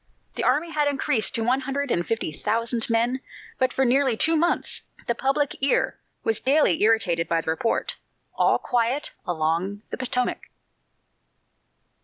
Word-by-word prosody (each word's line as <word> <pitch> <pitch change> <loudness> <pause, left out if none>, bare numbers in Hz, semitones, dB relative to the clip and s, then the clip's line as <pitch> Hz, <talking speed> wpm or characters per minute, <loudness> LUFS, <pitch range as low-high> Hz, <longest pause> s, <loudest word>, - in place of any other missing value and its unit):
The - - -3
army 330 +3 +1
had 300 -2 +1
increased 265 -6 +1
to 225 - -1
one 250 +3 +2
hundred 275 0 -3
and 175 - +1
fifty 225 -4 -2
thousand 230 - -1
men, 235 +3 +1 0.4
but 260 0 +2
for 265 - +1
nearly 260 -1 +3
two 325 +7 +3
months 340 +2 0 0.2
the 235 - +1
public 270 +3 0
ear 275 - +1 0.2
was 225 -1 +1
daily 275 - +3
irritated 200 -7 +2
by 165 - +2
the 160 - -2
report, 225 +8 -1 0.4
"All - - +3
quiet 245 +4 -1 0.2
along 175 +5 -1
the - - -4
Potomac." 250 -1 -2
240 Hz, 150 wpm, -24 LUFS, 210-270 Hz, 0.4 s, nearly